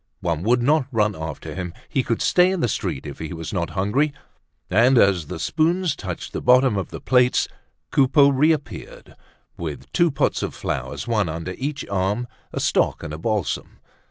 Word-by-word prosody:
One 85 -4 -1
would 120 +5 +2
not 145 0 +3
run 105 -3 +1
after 80 -2 -6
him; 90 -2 -5
he 135 - 0
could 115 -2 -1
stay 180 0 +4
in 190 -2 -1
the - - +2
street 70 - -3
if 70 -2 -8
he 80 0 -5
was 80 +2 -6
not 85 -4 -1
hungry; 135 +11 +1 0.5
and 120 +7 +4
as 95 -8 +4
the 90 - -5
spoons 160 - +1
touched 90 -4 -6
the - - -3
bottom 125 -2 +5
of 95 - -2
the - - -7
plates, 125 -1 +3 0.4
Coupeau 140 +1 +5
reappeared 155 - -1 0.4
with - - -6
two 170 -1 +4
pots 140 -1 0
of - - -3
flowers, - - -4
one 105 -7 +1
under 85 +3 -4
each 145 +2 -4
arm, 100 +5 -1 0.2
a - - -3
stock - - +1
and 75 - -5
a 75 - -6
balsam. 105 -4 -2
115 Hz, 185 wpm, -23 LUFS, 90-140 Hz, 0.5 s, bottom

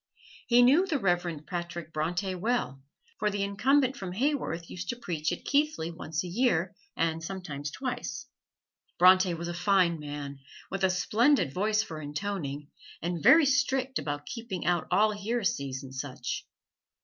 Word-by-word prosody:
He 245 0 +6
knew 300 +10 +5
the 315 - +1
Reverend 175 - 0
Patrick 170 -2 -5
Bronte 175 +5 -1
well, 180 - -1 0.4
for 210 - +2
the 200 -1 -1
Incumbent 260 +7 +2
from 190 -7 -6
Haworth 230 - -1
used 180 - -7
to 240 - -1
preach 165 -9 -2
at 175 - -5
Keighley 285 - +1
once 160 -1 -4
a - - -5
year, 185 -3 +1 0.2
and 165 0 0
sometimes 160 -6 -5
twice. 245 - -4 0.7
Bronte 185 0 +6
was 170 +1 -5
a 175 - -3
fine 180 -2 +2
man, 145 -1 -6 0.3
with 195 0 -3
a 190 - +5
splendid 215 - +2
voice 215 +3 +1
for 160 -7 -7
intoning, 150 -2 -4 0.3
and 170 -1 -2
very 320 - +7
strict 270 -1 +1
about 145 0 -4
keeping 225 -7 -5
out 175 0 +1
all 215 +1 +4
heresies 205 - -2
and 135 -1 -10
such. 130 -2 -5
180 Hz, 155 wpm, -29 LUFS, 160-230 Hz, 0.7 s, very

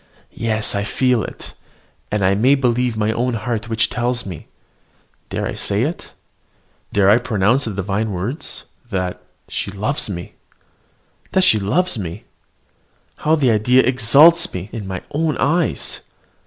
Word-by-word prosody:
Yes, 110 -2 0
I 100 0 -1
feel 125 +1 +1
it; - - -8 0.6
and 105 -2 0
I 95 - +4
may 125 +8 +4
believe 125 -3 0
my 110 0 +1
own 120 +2 -1
heart 115 -1 -3
which 110 -2 +2
tells 125 0 -1
me 90 -6 -8 0.8
dare - - -2
I - - -3
say 100 +3 0
it? 160 +6 -4 0.8
dare 100 -2 +3
I 105 +4 +6
pronounce 120 +3 +1
the 110 - -3
divine 100 +2 -1
words? 100 - -3 0.3
that 90 -3 -3 0.3
she - - -3
loves 105 +7 -2
me! 85 -3 -6 1.0
That 190 - +4
she 110 -12 +5
loves 140 - +1
me! 90 +1 -6 0.9
How 155 +1 +2
the 135 -6 +2
idea 125 +4 +4
exalts 140 +8 +5
me 90 +3 -5
in 110 -5 -6
my 95 -1 -5
own 155 +1 0
eyes! 165 +2 0
115 Hz, 150 wpm, -19 LUFS, 100-130 Hz, 1.0 s, I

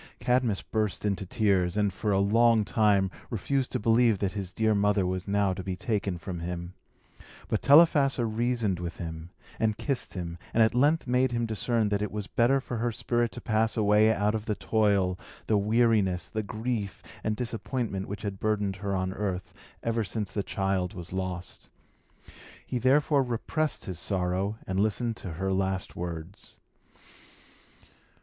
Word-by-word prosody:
Cadmus 125 -5 +1
burst 105 -2 -2
into 100 -2 -1
tears, 95 -3 +1
and, 105 -2 +1
for 105 +3 -2
a 95 - +3
long 110 +2 +4
time, 100 -4 +2 0.2
refused 130 +4 -1
to - - 0
believe 115 0 +4
that 95 0 -1
his 100 -3 -4
dear 110 +2 +1
mother 100 -1 +2
was 95 +1 -3
now 100 -1 +2
to 95 0 -6
be 95 0 -3
taken 100 -3 -2
from 85 0 -6
him. 85 +1 -5 0.7
But 110 - -1
Telephassa 140 -4 +5
reasoned 115 -4 0
with 85 -1 -5
him, 80 -1 -6 0.3
and 110 -1 +1
kissed 135 -8 -1
him, 85 -2 -5 0.2
and 115 - +6
at 110 - +2
length 145 +6 +3
made 125 0 +2
him 120 0 0
discern 110 0 0
that 100 0 0
it 105 - -2
was 105 -1 -4
better 120 +6 +2
for 125 -2 -5
her 120 +1 0
spirit 120 +1 0
to 120 - -8
pass 110 +1 +1
away 105 +1 +4
out 105 -1 +1
of 110 -1 -3
the 105 - -1
toil, 100 -5 +1 0.3
the 110 - +2
weariness, 105 -4 +2
the 110 - -2
grief, 110 -1 -4 0.2
and 110 - 0
disappointment 115 -3 -3
which 100 - -6
had 100 -2 -4
burdened 105 -3 0
her 100 0 -2
on 95 0 -1
earth, 95 -3 -3 0.3
ever 115 -1 0
since 105 0 -3
the 100 - -1
child 95 0 -1
was 90 0 -8
lost. 95 -1 -5 1.0
He 125 - -2
therefore 140 +3 +3
repressed 135 +5 -2
his 90 -3 -5
sorrow, 95 +2 -1
and 95 0 -2
listened 110 +3 0
to 90 - -6
her 95 +3 -1
last 95 0 -1
words. 85 +1 -7
105 Hz, 170 wpm, -28 LUFS, 95-115 Hz, 1.0 s, and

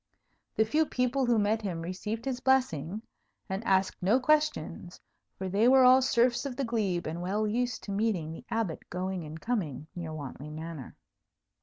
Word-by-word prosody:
The 220 - +3
few 305 +7 +2
people 250 +1 0
who 240 -1 +4
met 215 +1 +2
him 175 -5 -3
received 210 +6 -4
his 260 -2 -2
blessing, 220 - +1 0.4
and 190 +1 -3
asked 190 -2 +1
no 205 +8 +4
questions; 265 - 0 0.4
for 190 - -4
they 200 +5 +3
were 260 0 +7
all 255 +1 +7
serfs 240 -1 +2
of 275 -3 -4
the 275 - -1
glebe, 205 -7 -1
and 165 +2 -4
well 200 +4 0
used 240 +2 -1
to 200 - -6
meeting 195 -6 0
the 165 - -9
Abbot 220 -8 -2
going 185 0 -3
and 155 +1 -8
coming 160 - -2
near 170 -2 -5
Wantley 145 -1 -7
Manor. 160 -3 -7
210 Hz, 175 wpm, -29 LUFS, 175-245 Hz, 0.4 s, were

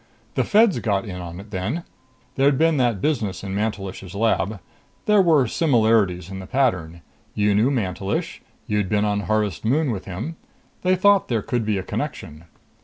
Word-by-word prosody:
"The - - +1
Feds 215 -2 +4
got 100 -3 0
in 95 -4 -6
on 85 0 -7
it 105 +2 -12
then. 100 - -2 0.5
There'd 135 +1 +3
been 160 0 +3
that 120 -7 +1
business 105 - -1
in 95 -1 -4
Mantelish's 100 -3 -4
lab. 105 -2 0 0.5
There 210 -1 +5
were 160 -7 +4
similarities 110 - +2
in 95 - -6
the 95 - -8
pattern. 90 -11 0 0.3
You 105 0 +2
knew 110 +6 +3
Mantelish. 100 -6 -2 0.2
You'd 105 -3 -1
been 105 0 +2
on 105 -1 0
Harvest 105 -4 -1
Moon 140 +4 +1
with 100 -4 -5
him. 110 - -5 0.4
They 185 0 +3
thought 200 +1 +4
there 115 -4 -1
could 120 -3 -2
be 105 -2 +1
a 95 - -3
connection." 75 -2 -5
105 Hz, 175 wpm, -22 LUFS, 95-135 Hz, 0.5 s, There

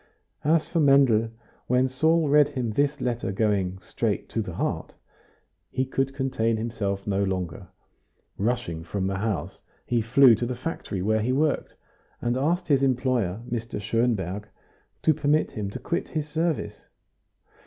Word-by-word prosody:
As 155 +1 +3
for 170 - -1
Mendel, 135 -6 +5 0.4
when 125 +1 +3
Saul 160 +5 +2
read 145 0 +5
him 130 -6 -3
this 140 +5 +1
letter 120 -5 -1
going 100 -3 0
"straight - - -2
to - - -1
the - - -6
heart," - - -2 0.8
he 130 - -1
could 135 +1 -1
contain 125 -4 0
himself 100 -4 -3
no 100 -1 +1
longer; 90 -2 -3 0.7
rushing 105 -7 -2
from 95 +3 -3
the 95 0 -1
house 100 -8 -2 0.3
he 120 -1 +1
flew 125 +3 +6
to 120 +2 -1
the 125 - -3
factory 120 - -4
where 110 +2 +2
he 120 +4 0
worked, 145 +3 0 0.4
and 120 0 0
asked 170 +7 0
his 140 -3 +3
employer, 125 -7 +1
Mr. 115 -2 -4
Schonberg, 105 -3 -1 0.6
to 155 - +5
permit 150 +2 +1
him 105 -2 -4
to - - -6
quit 170 - -2
his 155 -2 -3
service. 160 +1 -2
120 Hz, 155 wpm, -26 LUFS, 105-140 Hz, 0.8 s, flew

